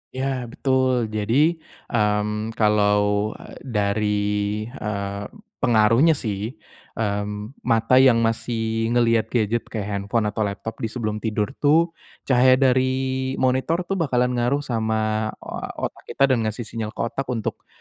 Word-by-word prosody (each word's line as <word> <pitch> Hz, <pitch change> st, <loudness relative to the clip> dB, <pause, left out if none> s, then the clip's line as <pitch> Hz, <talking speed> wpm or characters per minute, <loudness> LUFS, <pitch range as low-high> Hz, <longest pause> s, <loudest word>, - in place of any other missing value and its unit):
Iya, 130 Hz, -2 st, -2 dB
betul. 130 Hz, -4 st, +1 dB
Jadi, 110 Hz, +2 st, -1 dB, 0.6 s
mmm, 105 Hz, 0 st, 0 dB
kalau 105 Hz, -1 st, +2 dB, 0.2 s
dari, 105 Hz, -3 st, -1 dB, 0.6 s
eee, 100 Hz, -4 st, -4 dB, 0.4 s
pengaruhnya 115 Hz, +7 st, +4 dB
sih, 110 Hz, -1 st, -4 dB, 0.4 s
eee, 105 Hz, -2 st, -1 dB, 0.5 s
mata 115 Hz, +2 st, +3 dB
yang 120 Hz, -3 st, +5 dB
masih 115 Hz, 0 st, -1 dB
ngelihat 115 Hz, -2 st, +3 dB
gadget 115 Hz, 0 st, 0 dB
kayak 105 Hz, -3 st, -4 dB
handphone 100 Hz, +3 st, -1 dB
atau 110 Hz, -1 st, -1 dB
laptop 105 Hz, +3 st, -6 dB
di 115 Hz, -, -1 dB
sebelum 110 Hz, -2 st, -3 dB
tidur 105 Hz, +2 st, -1 dB
itu, 160 Hz, +4 st, +3 dB, 0.3 s
cahaya 130 Hz, 0 st, +5 dB
dari 130 Hz, 0 st, +1 dB
monitor 130 Hz, +7 st, +1 dB
itu 195 Hz, -, -3 dB
bakalan 125 Hz, -5 st, +1 dB
ngaruh 125 Hz, +4 st, 0 dB
sama, 110 Hz, -3 st, -1 dB, 0.2 s
eee, -, -, -6 dB
otak -, -, -4 dB
kita -, -, 0 dB
dan 125 Hz, -, +3 dB
ngasih 110 Hz, +3 st, -4 dB
sinyal 110 Hz, -1 st, -5 dB
ke -, -, -3 dB
otak 125 Hz, +3 st, -3 dB
untuk, 120 Hz, -4 st, -4 dB
115 Hz, 130 wpm, -23 LUFS, 105-130 Hz, 0.6 s, yang